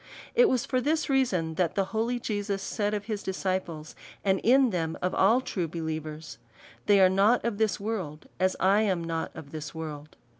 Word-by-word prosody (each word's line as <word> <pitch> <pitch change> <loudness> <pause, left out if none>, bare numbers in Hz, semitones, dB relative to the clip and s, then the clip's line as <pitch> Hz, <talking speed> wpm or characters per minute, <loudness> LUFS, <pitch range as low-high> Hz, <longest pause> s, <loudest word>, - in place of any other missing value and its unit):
It 485 -2 +5
was 250 -2 +1
for 255 -2 0
this 310 +3 0
reason, 190 -12 +1
that 170 -3 0
the 195 - +1
holy 235 +3 0
Jesus 205 -3 -3
said 210 0 -1
of 205 -1 -4
his 215 -2 -3
disciples, 185 -4 -3 0.3
and 190 -1 +3
in 255 +1 +4
them 165 -3 -2
of 180 - -1
all 225 +7 +4
true 180 -9 -3
believers, 155 -1 -5 0.2
" - - -23
They 205 -1 +6
are 190 - +7
not 200 +7 +3
of 225 -3 -2
this 220 -1 +1
world, 190 -8 -4
as 185 0 +2
I 195 +3 +4
am 190 -6 0
not 165 -1 -3
of 155 -3 -10
this 155 0 -7
world." 155 -2 -7
190 Hz, 195 wpm, -28 LUFS, 160-220 Hz, 0.3 s, are